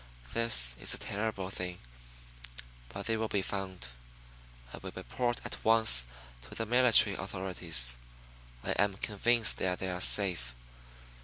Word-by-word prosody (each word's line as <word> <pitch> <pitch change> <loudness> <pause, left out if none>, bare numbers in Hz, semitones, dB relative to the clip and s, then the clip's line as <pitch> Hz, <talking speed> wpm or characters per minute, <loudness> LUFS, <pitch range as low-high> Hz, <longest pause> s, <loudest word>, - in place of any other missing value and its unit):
This 60 - +2
is - - +1
a - - -4
terrible 100 -2 -5
thing; 90 -2 -6 1.1
but 100 0 -9
they 115 0 -1
will 110 0 -3
be 100 -3 -2
found. 95 -6 -6 0.8
I - - -9
will - - -9
report 120 - -4
at - - -7
once 110 - +5 0.3
to 65 - -13
the 115 - -4
military 120 -4 +4
authorities. 90 -11 -1 0.7
I - - -3
am 100 +1 -1
convinced 115 +3 +1
that 90 -1 -2
they 95 -1 -5
are 90 0 -6
safe. 85 -15 +4
95 Hz, 140 wpm, -29 LUFS, 90-110 Hz, 1.1 s, once